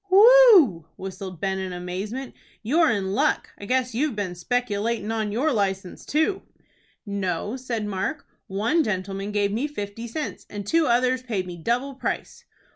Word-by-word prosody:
"Whew!" 390 - +7
whistled 185 -2 -7
Ben, 190 +1 -1
in 190 -1 -4
amazement. 190 +9 -5 0.3
"You're 310 +8 +3
in 195 -4 0
luck. - - +1
I 205 - -7
guess 250 +1 0
you've 270 +1 0
been 200 -4 -3
speculatin' 220 +2 -1
on 220 -2 -1
your 270 +8 +1
license 195 -4 -2
too." 315 +6 +1 0.6
"No," 200 +1 -2
said 245 -4 -3
Mark; 205 +9 -3 0.2
"one 225 - +1
gentleman 195 -2 -3
gave 205 -1 +1
me 240 +8 -1
fifty 225 -4 -6
cents, 300 +6 -5
and 205 -1 -6
two 325 +7 +2
others 255 +2 +2
paid 215 -7 -2
me 180 -1 -7
double 240 - -1
price." 265 - -4
215 Hz, 155 wpm, -24 LUFS, 195-260 Hz, 0.6 s, Whew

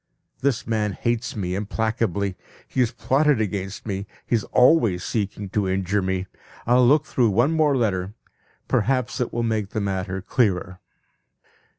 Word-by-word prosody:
This 135 -3 0
man 105 -3 0
hates 120 +2 -2
me 90 -4 -2
implacably; 105 -1 -1 0.3
he - - -4
has 120 -2 +3
plotted 140 +2 +2
against 100 -2 -3
me, 100 -2 -4 0.2
he - - +1
is 110 - 0
always 120 - +4
seeking 100 -2 -3
to 100 -1 0
injure 95 +2 0
me. 95 0 -1 0.4
I'll 125 +1 +5
look 150 +3 +4
through 120 -6 +2
one 120 +9 +3
more 155 -4 +3
letter; 100 -4 -1 0.5
perhaps 130 +1 0
it 125 - -1
will 120 - -1
make 110 -3 -1
the 110 - -3
matter 95 -1 -2
clearer. 95 -6 0
110 Hz, 155 wpm, -23 LUFS, 95-125 Hz, 0.5 s, I'll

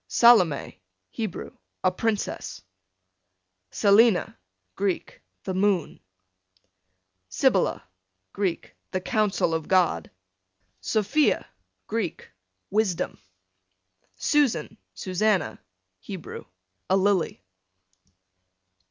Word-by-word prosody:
Salome, 185 - +4 0.3
Hebrew, 220 -6 -5 0.3
a 185 - +4
princess. 215 +2 -3 1.1
Selina, 205 -1 +4 0.4
Greek, 195 -2 -2 0.2
the 190 - -3
moon. 190 -4 +1 1.3
Sibylla, 95 - +2 0.5
Greek, 190 -4 -2 0.2
the 185 - -2
counsel 195 -3 +1
of 160 -1 -2
God. 175 - +2 0.7
Sophia, 215 - +1 0.4
Greek, 215 -6 -4 0.4
wisdom. 205 -4 0 1.0
Susan, 285 - +1 0.2
Susanna, 190 - 0 0.4
Hebrew, 185 - -8 0.4
a 190 - +4
lily. 190 - +1
195 Hz, 70 wpm, -26 LUFS, 180-215 Hz, 1.3 s, Salome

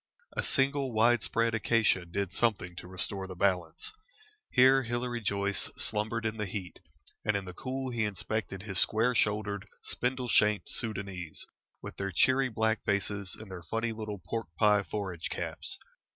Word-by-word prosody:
A - - +1
single 135 -1 +2
wide 115 +1 +4
spread 115 +1 +1
acacia 110 -4 +2
did 95 +2 -3
something 105 -7 +1
to 90 - -7
restore 95 +1 -2
the 95 - -7
balance. 90 -3 0 0.6
Here 130 +1 +6
Hilary 120 0 -2
Joyce 100 -1 0
slumbered 110 +2 -1
in 110 0 -1
the 105 -2 -2
heat, 95 -2 -6 0.4
and 105 -1 +2
in 100 - -5
the 90 - -7
cool 130 +5 -4
he 115 -2 0
inspected 100 -2 -3
his 95 -4 +2
square 115 +3 +3
shouldered, 105 -3 0 0.2
spindle 125 0 0
shanked 105 -3 +3
Soudanese, 95 -7 -3 0.4
with - - -7
their 100 0 -2
cheery 130 +7 +4
black 110 -1 0
faces 100 -1 -1
and 110 -3 -10
their 90 -2 -6
funny 115 +7 -2
little 110 -2 -5
pork 110 +5 -4
pie 105 -1 +5
forage 95 -2 -4
caps. - - -4
105 Hz, 160 wpm, -31 LUFS, 95-115 Hz, 0.6 s, Here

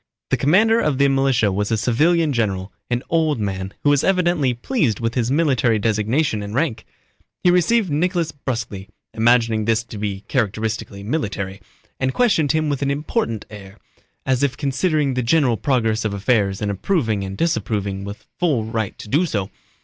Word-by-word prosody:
The - - +3
commander 215 +10 +4
of 150 - 0
the 140 0 +4
militia 135 -6 +2
was 100 +2 -1
a 110 - +2
civilian 150 +8 +2
general, 100 -5 -1 0.2
an 120 0 -1
old 160 -5 +1
man 95 -2 -3
who 145 - +4
was 145 -1 +2
evidently 175 -7 +2
pleased 125 - -1
with 115 0 -1
his 120 -2 0
military 130 -6 +2
designation 110 +4 0
and 100 +1 -6
rank. 130 -7 -1 0.6
He 180 - +5
received 180 +2 +2
Nicholas 170 +1 0
brusquely 115 -8 -5 0.2
(imagining 115 -1 +2
this 115 0 +1
to 115 -3 -9
be 100 -2 -3
characteristically 110 -3 -2
military) 100 -6 -3 0.4
and 130 0 -1
questioned 175 - +3
him 155 0 +1
with 145 -2 -2
an 140 - 0
important 140 - -2
air, 100 -1 -11 0.5
as 130 -2 +1
if 140 -2 0
considering 145 0 0
the 125 - 0
general 125 0 +2
progress 110 -2 0
of 105 -2 -2
affairs 100 -2 +1
and 105 - 0
approving 110 - 0
and 95 0 -6
disapproving 100 - -1
with 100 +2 -8
full 145 -11 +1
right 110 -2 -3
to - - -10
do 150 +10 +2
so. 100 -9 -3
120 Hz, 170 wpm, -21 LUFS, 105-150 Hz, 0.6 s, He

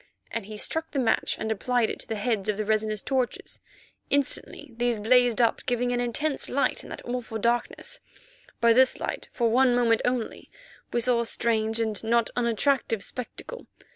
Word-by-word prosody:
and 225 -3 -4
he 215 0 -7
struck 320 +9 -1
the 290 - -5
match 235 -4 +1
and 220 0 -3
applied 235 +2 +1
it - - -5
to - - -9
the 225 - -2
heads 215 -1 -1
of 210 - 0
the 215 - -2
resinous 215 -1 0
torches. 260 -3 -2 0.5
Instantly 280 -2 0
these 240 -1 0
blazed 245 +2 +4
up, 230 -2 +2
giving 245 0 +1
an 245 - 0
intense 270 +5 -1
light 280 - +1
in - - -11
that - - -8
awful 245 -2 -3
darkness. 240 - -1 0.6
By 235 0 +5
this 260 +2 +4
light, - - -4
for 235 -2 +1
one 250 +1 +4
moment 230 -2 +3
only, 245 -2 -2 0.4
we 240 - +1
saw 245 0 +3
a - - -2
strange, 225 -1 0
and 220 -2 -2
not 230 0 +2
unattractive 235 -2 +1
spectacle. 450 - -7
235 Hz, 180 wpm, -26 LUFS, 220-250 Hz, 0.6 s, By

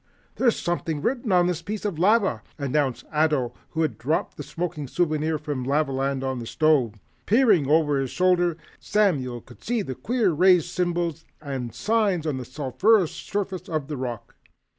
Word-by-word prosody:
"There's 240 -3 +3
something 165 -3 -2
written 240 -4 -1
on 180 -1 +5
this 175 -2 -1
piece 210 +5 -5
of 190 -7 -2
lava," 195 - +3 0.2
announced 140 -2 -1
Ato, 150 -5 +1 0.2
who 165 -1 -1
had 155 - -2
dropped 150 +7 -1
the - - -7
smoking 165 -4 -4
souvenir 155 0 0
from 145 -4 -4
Lavaland 135 -1 0
on 130 -1 -2
the 115 - -6
stove. 145 -8 +2 0.3
Peering 210 - +4
over 150 -2 +3
his 135 -1 -2
shoulder, 175 -1 +2 0.2
Samuel 140 - 0
could - - -17
see 235 -2 0
queer 195 - 0
raised 180 +1 +4
symbols 170 -2 -1 0.2
and 135 -6 -5
signs 210 -7 +1
on 150 -4 -1
the 130 - -6
sulphurous 155 - +2
surface 195 -2 -4
of 155 -3 -2
the 150 - -3
rock. 120 -3 -6
155 Hz, 160 wpm, -25 LUFS, 135-185 Hz, 0.3 s, on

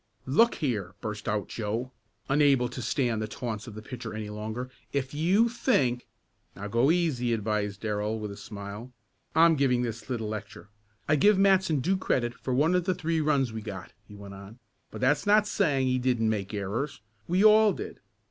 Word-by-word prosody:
"Look 230 - +4
here," 105 - -2
burst 105 +1 -5
out 105 0 -1
Joe, 115 +4 -3 0.4
unable 135 -3 +3
to 125 +1 -6
stand 115 -1 0
the 110 - -2
taunts 110 0 -5
of 110 - -9
the 110 - -8
pitcher 115 -3 -7
any 105 -1 -5
longer, 110 +4 -5 0.2
"if 135 -1 -2
you 185 +10 +3
think 195 - 0 0.2
" - - -42
"Now, 100 +3 -6
go 120 +6 +3
easy," 155 -9 +1
advised 105 -2 -2
Darrell 105 0 -1
with 105 -2 -5
a - - -8
smile. 100 +4 -8 0.4
"I'm 165 0 +6
giving 130 -4 +2
this 115 +2 -5
little 115 -4 -2
lecture. 105 -1 -7 0.4
I 150 - +3
give 205 +7 +5
Matson 190 -6 +3
due 190 +7 +1
credit 120 -9 0
for 130 - -6
one 155 +6 +3
of 180 -1 +1
the 185 -1 +1
three 165 -2 -1
runs 140 -6 +1
we 110 - -5
got," 95 -4 -8
he 105 - -12
went 100 -1 -10
on, 100 +3 -11 0.3
"but - - -9
that's 145 +9 +2
not 210 +1 +5
saying 145 -11 +1
that 130 - +1
he 130 - +1
didn't 120 -3 +1
make 100 -3 -3
errors. 105 +8 -3 0.3
We 185 +4 +3
all 215 0 +7
did. - - -7
125 Hz, 195 wpm, -28 LUFS, 105-155 Hz, 0.4 s, all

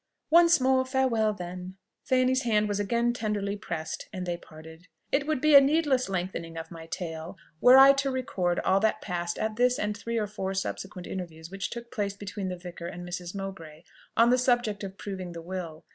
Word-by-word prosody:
"Once 340 0 +7
more, 260 0 +3
farewell, 260 -5 +1
then!" 180 -1 -7 0.3
Fanny's 255 0 +2
hand 215 -3 +2
was 205 -1 -1
again 235 +3 +1
tenderly 210 -3 -2
pressed, 165 -6 -5
and 185 -3 -5
they 175 -1 -1
parted. 160 +1 -13 0.2
It 280 +1 +1
would 310 -4 0
be 305 +2 +3
a 280 - +11
needless 275 -4 +2
lengthening 175 -3 -4
of 165 +1 -7
my 165 -1 -9
tale, 165 +1 -6 0.2
were 250 +7 +8
I 270 +1 +9
to 275 0 0
record 190 -9 -1
all 190 +1 +3
that 220 +1 +1
passed 175 -2 -3
at 220 0 -2
this 250 +1 +3
and 210 0 -1
three 230 +3 -4
or 215 - +1
four 195 -2 -4
subsequent 190 -1 -4
interviews 165 -3 -7
which 195 0 -4
took 235 0 -8
place 200 -2 -2
between 200 -1 -5
the 180 - -4
vicar 175 -1 -8
and 175 +1 -7
Mrs. 175 +1 -6
Mowbray 170 -5 -7 0.3
on 235 +1 +6
the 250 - +4
subject 240 -5 +1
of 195 0 -7
proving 185 -3 -6
the 170 - -7
will. 170 -3 -6
200 Hz, 200 wpm, -28 LUFS, 175-245 Hz, 0.3 s, a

